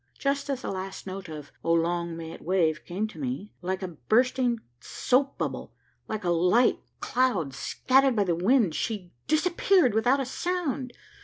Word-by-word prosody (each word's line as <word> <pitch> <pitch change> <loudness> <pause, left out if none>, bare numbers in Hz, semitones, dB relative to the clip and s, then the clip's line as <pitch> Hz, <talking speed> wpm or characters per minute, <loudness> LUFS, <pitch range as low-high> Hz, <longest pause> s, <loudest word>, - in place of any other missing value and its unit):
Just 280 +1 -1
as 270 -2 -2
the - - -3
last 190 0 -6
note 190 -2 -6
of 150 -2 -8
'Oh 165 - +2
long 170 0 0
may 165 -1 -6
it - - -10
wave' 165 -4 +1
came 200 +5 -2
to - - -12
me, 250 -7 -4
like 185 +2 -2
a - - -2
bursting 240 - +1 0.2
soap 265 - 0
bubble, - - -4 0.3
like 215 -3 -4
a 175 - +1
light 180 +9 +3 0.2
cloud 210 - +1
scattered 265 - +2
by 210 - +3
the 180 -3 +1
wind, 195 - +3
she 195 -4 -3 0.2
disappeared 345 - +3
without 245 +5 +3
a 270 - -1
sound! 290 -3 -2
215 Hz, 170 wpm, -27 LUFS, 175-260 Hz, 0.3 s, light